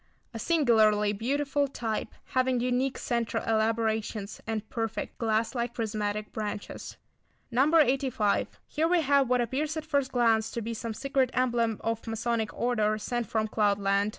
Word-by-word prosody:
A 225 - -5
singularly 220 -9 +3
beautiful 280 +6 0
type, 225 -5 -4 0.2
having 255 -1 +2
unique 250 +2 0
centre 235 -3 -1
elaborations, 220 -2 0
and 220 -1 -3
perfect, 225 -1 -4
glass 225 0 +1
like 240 -1 -2
prismatic 210 -2 -2
branches. 210 -1 -5 0.5
No. 260 +5 +3
85. 260 -7 +2
Here 320 +1 0
we 350 0 +3
have 280 -2 +3
what 250 -1 +3
appears 290 +6 -1
at 315 - -4
first 280 -4 0
glance 225 -3 +3
to 235 - -2
be 230 +2 -3
some 230 0 -5
secret 270 0 +1
emblem 235 -3 +1
or 225 0 0
Masonic 225 -1 -1
order 215 -3 +1
sent 240 +1 -2
from 220 +1 0
cloud 210 -2 +2
land. 200 +1 +1
230 Hz, 150 wpm, -28 LUFS, 215-260 Hz, 0.5 s, singularly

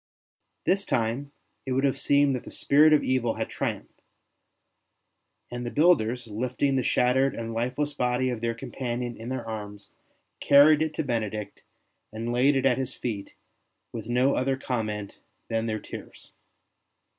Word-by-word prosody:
This 195 +2 +2
time 125 - -1 0.3
it 130 - -3
would 135 +1 +1
have 140 -1 +1
seemed 140 -1 +3
that 125 - -5
the - - -10
spirit 150 +2 +4
of 150 -1 +4
evil 125 -3 0
had - - -3
triumphed; - - -5 1.5
and 120 0 -4
the 120 - -3
builders, 125 -6 +2
lifting 125 +5 -1
the 130 - +2
shattered 130 +2 +2
and 115 0 -5
lifeless 125 +6 -1
body 125 +1 0
of 120 -3 -4
their 115 0 -1
companion 120 0 -4
in 115 +2 -8
their 130 -3 -4
arms, 105 -2 -7 0.5
carried 145 +2 +6
it 155 -1 -1
to - - -1
Benedict 110 -5 -3 0.5
and 115 +2 -4
laid 135 +4 +3
it 135 0 +1
at 135 0 +3
his 130 0 -4
feet 105 -5 -5 0.6
with 115 -2 -6
no 125 +3 +3
other 130 +1 0
comment 110 -6 -4 0.3
than 115 0 -1
their 110 -1 -2
tears. - - -11
125 Hz, 155 wpm, -26 LUFS, 115-135 Hz, 1.5 s, carried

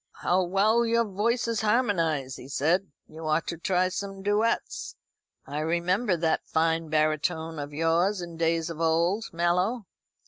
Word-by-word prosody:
"How 180 +1 +3
well 205 +6 +3
your 235 0 +2
voices 230 +3 0
harmonise," 170 - +1
he 125 - -10
said. 165 +8 +1 0.2
"You 155 0 -8
ought 155 +1 +1
to 170 - -4
try 185 +1 +1
some 195 +1 -5
duets. 210 +3 0 0.5
I 145 +2 -4
remember 175 +5 +1
that 160 -1 +1
fine 165 0 +1
baritone 155 +1 0
of 145 0 -5
yours 165 +6 +1
in 170 -1 -7
days 165 0 0
of 165 0 -7
old, 170 +7 +2
Mallow." 180 +7 0
175 Hz, 145 wpm, -27 LUFS, 160-200 Hz, 0.5 s, How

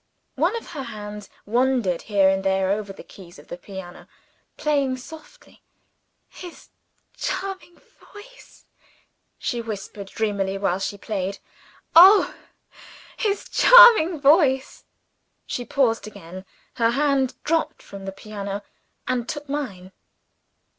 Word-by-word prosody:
One 335 - 0
of 455 -6 -7
her 300 -5 -6
hands 210 -4 -8 0.2
wandered 240 -5 +1
here 200 -3 +2
and 190 0 +1
there 190 0 +1
over 205 -1 -3
the 195 - -12
keys 175 -3 -15
of 145 - -17
the - - -5
piano, 185 -1 -11 0.5
playing 280 -4 0
softly. 320 - -14 0.7
"His 355 -2 -12 0.5
charming 375 -2 -5 0.3
voice!" - - -16 0.7
she 240 - -3
whispered 205 -2 -7
dreamily 195 -2 -2
while 195 -2 -1
she 200 +1 -4
played. 200 -2 -4 0.6
"Oh, 380 +5 +8 0.8
his 415 -3 -2
charming 465 -10 +7
voice!" 280 -2 +2 0.6
She 245 - -5
paused 230 -6 0
again. 185 -2 -11 0.3
Her 230 -2 +3
hand 270 0 +1
dropped 320 -1 -1
from 195 -1 -10
the 195 - -4
piano, 200 0 -7 0.4
and 245 -2 -2
took 295 -1 -6
mine. 235 -11 -5
235 Hz, 120 wpm, -23 LUFS, 195-300 Hz, 0.8 s, Oh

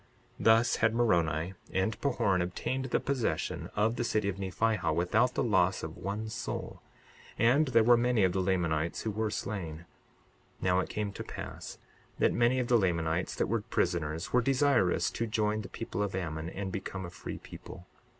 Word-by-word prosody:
62:26 - - -5
Thus 115 +2 +5
had 110 +1 +2
Moroni 85 -7 +1 0.2
and 95 +3 -1
Pahoran 100 -9 +1
obtained 130 +9 -2
the 125 - +1
possession 135 -5 -2
of 110 +3 +1
the 120 - 0
city 110 -3 0
of 95 - -4
Nephihah 110 +4 0
without 110 +8 +2
the - - +1
loss 95 -4 +2
of 80 0 -5
one 105 +3 -4
soul; 110 - -5 0.6
and 130 +7 +4
there 115 -3 +4
were 120 +1 +6
many 120 -3 +2
of 95 - +4
the 95 - +1
Lamanites 85 -4 0
who 110 - -1
were 110 +1 -1
slain. 85 -6 -4 0.7
62:27 - - -10
Now 90 0 +3
it - - -2
came 105 -1 -2
to - - -6
pass - - -7 0.4
that - - +3
many 120 +2 +3
of 125 -2 0
the 120 -1 +4
Lamanites 85 -2 0
that - - +1
were 115 0 0
prisoners 85 -7 -1
were 125 - +5
desirous 130 -6 +2
to 115 - -2
join 110 0 0
the - - -9
people 115 -2 -4
of 100 -2 -1
Ammon 80 -3 -3
and 95 +1 -5
become 95 -1 -5
a 85 - -8
free - - -7
people. 90 - -11
105 Hz, 190 wpm, -30 LUFS, 90-115 Hz, 0.7 s, were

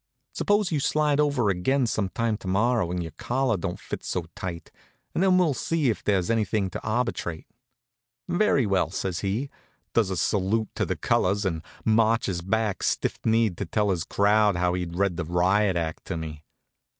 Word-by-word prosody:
Suppose 205 -3 +1
you 155 - +1
slide 150 +1 +1
over 140 -8 +2
again 130 +9 +1
some 105 -4 -1
time 115 +2 -1
to 105 - -10
morrow, 110 +1 +2
when 90 +1 -2
your 80 -1 -5
collar 130 -1 0
don't 90 -1 -4
fit - - -6
so 90 -2 -2
tight, 85 -3 -6 0.4
and - - 0
then 190 -1 +4
we'll 175 -5 +3
see 150 -1 0
if - - -6
there's 100 0 +1
anything 105 -3 0
to - - -5
arbitrate." 110 -7 -2 0.8
"Very 175 - +2
well," 95 -4 +1
says 95 0 -3
he, 110 +8 -2 0.4
does 110 -5 +2
a 95 - -2
salute 105 +4 +1
to - - -1
the - - -1
colors, 100 +3 +1
and 80 -4 -1 0.2
marches 110 -4 +2
back 100 +1 -1
stiff - - -1
kneed 110 -5 +2
to 100 - -3
tell 105 +2 +1
his 85 -3 -1
crowd 105 +1 +3
how 90 0 +1
he'd 90 -2 -3
read 95 -2 0
the 85 - -2
riot 95 +4 +2
act 80 -2 -3
to - - -3
me. 75 -2 -7
105 Hz, 185 wpm, -26 LUFS, 90-115 Hz, 0.8 s, then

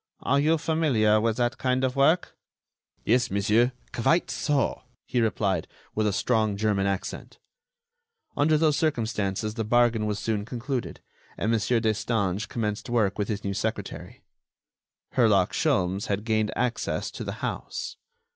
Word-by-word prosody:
Are 140 +3 +2
you 155 +3 +3
familiar 140 -10 +2
with 115 0 0
that 120 +1 0
kind 130 0 +1
of 130 0 0
work?" 155 +6 +3 0.7
"Yes, 125 +2 +3
monsieur, 110 +5 +2 0.2
quite 125 +3 +2
so," 135 +1 0 0.2
he 125 -1 0
replied, 100 -6 0 0.3
with 110 0 +1
a - - +2
strong 110 0 +1
German 100 -2 +1
accent. 100 -1 -4 1.0
Under 155 +2 +3
those 155 -1 +3
circumstances 110 -8 -1
the 110 0 -2
bargain 115 -1 +2
was 105 -1 -1
soon 105 -1 -1
concluded, 125 +3 -4 0.4
and 110 - 0
Mon. 115 - +3 0.2
Destange 105 -2 0
commenced 105 -2 -3
work 110 -4 +1
with 100 - 0
his 105 -1 -3
new 100 - -2
secretary. 110 +3 -4 0.9
Herlock - - +3
Sholmes 95 +2 +1
had 100 0 -1
gained 110 -1 +1
access 125 -1 -1
to - - -6
the - - -4
house. 480 -1 -5
115 Hz, 145 wpm, -26 LUFS, 105-130 Hz, 1.0 s, you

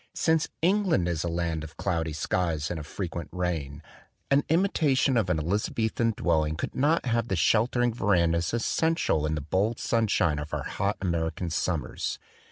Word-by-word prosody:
Since 160 -1 +2 0.2
England 185 - +2
is 85 -2 -1
a - - -2
land 85 -2 -2
of 80 0 -10
cloudy 80 -4 -1
skies 80 -1 -1
and 85 - -3
of 75 - -8
frequent 85 -3 -5
rain, 80 -5 -3 0.5
an 140 +1 +4
imitation 155 -6 +2
of 110 -6 +1
an 90 - +2
Eliza 90 +7 -1
bethan 115 0 0
dwelling 80 -4 +1
could 80 - -4
not 150 +4 +2
have 115 -2 0
the 95 - 0
sheltering 115 +7 +2
verandas 85 -6 +2
essential 120 - +1
in 80 - -1
the 75 - -3
bold 100 +10 0
sunshine 100 -9 +1
of 75 +1 -4
our - - -3
hot 100 +1 -2
American 85 -1 -2
summers. 80 -5 -2
90 Hz, 170 wpm, -27 LUFS, 80-115 Hz, 0.5 s, an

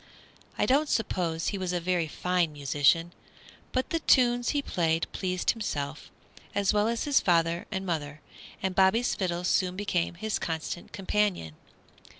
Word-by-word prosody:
I - - +2
don't 285 +3 +2
suppose 175 -7 -1
he 200 - -3
was 185 -1 -2
a 175 - 0
very 175 -1 0
fine 180 +1 0
musician, 145 +4 +2 0.6
but 260 +7 -1
the 330 - +1
tunes 245 -5 +3
he 290 -1 0
played 165 -5 0
pleased 185 -1 0
himself, 150 -9 -4 0.5
as 200 0 +2
well 210 +1 +2
as 230 0 -1
his 290 -2 +3
father 170 -2 +1
and 190 -2 -3
mother, 155 -4 -3 0.4
and 190 -1 0
Bobby's 195 +6 +3
fiddle 175 -2 -2
soon 185 0 +1
became 180 -3 -1
his 215 +4 -2
constant 165 +1 -4
companion. 195 - -1
180 Hz, 155 wpm, -28 LUFS, 165-210 Hz, 0.6 s, tunes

